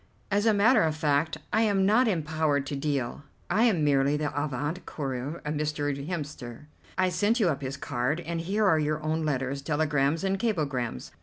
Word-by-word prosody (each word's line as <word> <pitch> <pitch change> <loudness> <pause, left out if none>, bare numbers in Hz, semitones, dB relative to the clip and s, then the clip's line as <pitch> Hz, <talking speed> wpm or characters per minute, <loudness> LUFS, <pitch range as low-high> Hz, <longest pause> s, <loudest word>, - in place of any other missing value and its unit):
"As 205 +3 +2
a - - +6
matter 220 +3 +5
of 160 -4 +1
fact 150 +1 +1 0.2
I 220 - +4
am 200 -3 +3
not 225 +5 +4
empowered 155 -6 0
to 140 - -4
deal. 140 -3 -2 0.3
I 220 +6 +4
am 190 -10 +2
merely 140 0 +3
the 150 -1 -2
avant 145 +4 -2
coureur 135 +2 -4
of 150 - -1
Mr. 150 -1 -1 0.2
Hemster. 145 -7 -6 0.3
I 185 -1 +3
sent 215 +6 +1
you 200 -6 +3
up 140 -4 -2
his 135 +1 -4
card, 130 +4 -1
and 170 -1 -3
here 205 +5 0
are 160 -5 +4
your 155 0 -1
own 155 +1 -1
letters, 135 -1 -1
telegrams, 150 +1 +1
and 195 0 0
cablegrams. 140 - -2
155 Hz, 185 wpm, -27 LUFS, 140-185 Hz, 0.3 s, a